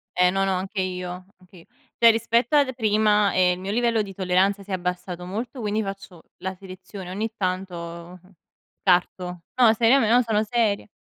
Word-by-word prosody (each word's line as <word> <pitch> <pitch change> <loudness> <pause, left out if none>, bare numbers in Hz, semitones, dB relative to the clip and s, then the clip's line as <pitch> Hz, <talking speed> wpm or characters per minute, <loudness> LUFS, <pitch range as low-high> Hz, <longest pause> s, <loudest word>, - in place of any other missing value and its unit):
Eh 180 0 +4
no, 195 0 0
no, 190 - +1
anche 190 +2 -3
io. 180 0 -5
Anch 180 -2 -18 0.4
cioè 230 -1 +9
rispetto 230 +4 +1
ad 275 -3 +3
prima, 210 -2 +2
ehm, 180 -1 +3
il - - -11
mio 195 +2 -4
livello 230 -1 +1
di 195 -2 -6
tolleranza 190 +2 +1
si 200 - -20
è - - -1
abbassato 180 0 -4
molto, 230 +7 -5
quindi 215 0 -1
faccio 195 -3 -8
la 190 0 -5
selezione, 185 0 -10
ogni 215 +4 -3
tanto, 185 -2 -3 0.5
mhmm, 185 +1 -22 0.5
parto. 180 -1 0
No, 235 -3 +5
seriame 230 +1 +3
no 245 +2 +5
sono 220 -2 0
seria. 215 -2 0
195 Hz, 180 wpm, -24 LUFS, 185-220 Hz, 0.5 s, cioè